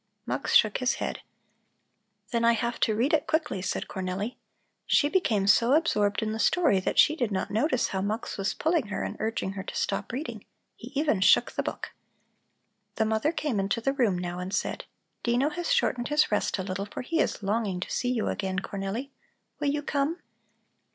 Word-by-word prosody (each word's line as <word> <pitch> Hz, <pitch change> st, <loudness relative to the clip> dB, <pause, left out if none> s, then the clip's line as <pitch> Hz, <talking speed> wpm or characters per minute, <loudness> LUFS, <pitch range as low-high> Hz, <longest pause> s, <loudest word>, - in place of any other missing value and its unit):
Mux -, -, -1 dB
shook 215 Hz, -2 st, +5 dB
his 255 Hz, 0 st, +1 dB
head. -, -, -3 dB, 1.1 s
"Then 235 Hz, -1 st, +1 dB
I 235 Hz, 0 st, +5 dB
have 235 Hz, +1 st, -2 dB
to 215 Hz, -, +2 dB
read 245 Hz, +8 st, +1 dB
it 305 Hz, -2 st, +2 dB
quickly," 315 Hz, -, 0 dB
said 185 Hz, -, -2 dB
Cornelli. 190 Hz, +4 st, -3 dB, 0.5 s
She 290 Hz, -, +4 dB
became 230 Hz, -, +1 dB
so 235 Hz, +5 st, +5 dB
absorbed 210 Hz, -10 st, +2 dB
in 215 Hz, -, -1 dB
the 220 Hz, -, -4 dB
story 290 Hz, -, +3 dB
that 185 Hz, -, -2 dB
she 305 Hz, -, +6 dB
did 245 Hz, -8 st, -1 dB
not 190 Hz, -, -2 dB
notice 255 Hz, +4 st, +1 dB
how 190 Hz, -, -2 dB
Mux 215 Hz, +4 st, -3 dB
was 195 Hz, 0 st, -2 dB
pulling 320 Hz, -7 st, +1 dB
her 205 Hz, -, -3 dB
and -, -, -4 dB
urging 220 Hz, -3 st, -2 dB
her 195 Hz, 0 st, -5 dB
to -, -, -7 dB
stop 200 Hz, 0 st, -1 dB
reading; 275 Hz, +7 st, -5 dB, 0.3 s
he -, -, -11 dB
even 295 Hz, -11 st, +1 dB
shook -, -, +5 dB
the -, -, -1 dB
book. -, -, -5 dB, 1.0 s
The 220 Hz, -, +1 dB
mother 220 Hz, +7 st, +1 dB
came 300 Hz, -9 st, -1 dB
into 195 Hz, +4 st, 0 dB
the 270 Hz, +4 st, 0 dB
room 235 Hz, -9 st, +2 dB
now 175 Hz, 0 st, -4 dB
and 180 Hz, +1 st, -5 dB
said: -, -, -2 dB, 0.4 s
"Dino 245 Hz, +4 st, +2 dB
has 350 Hz, +8 st, -3 dB
shortened 250 Hz, -, +1 dB
his 295 Hz, -4 st, +2 dB
rest 210 Hz, -, +1 dB
a 190 Hz, -, -3 dB
little, 195 Hz, +1 st, -4 dB
for 210 Hz, -, -6 dB
he 330 Hz, +5 st, -1 dB
is 220 Hz, -, 0 dB
longing 200 Hz, -2 st, 0 dB
to -, -, -5 dB
see 245 Hz, -, 0 dB
you 245 Hz, -3 st, 0 dB
again, 190 Hz, -2 st, -2 dB
Cornelli. 200 Hz, +7 st, -4 dB, 0.5 s
Will 290 Hz, -, -1 dB
you 295 Hz, +1 st, -1 dB
come?" 290 Hz, +3 st, 0 dB
225 Hz, 200 wpm, -27 LUFS, 200-285 Hz, 1.1 s, she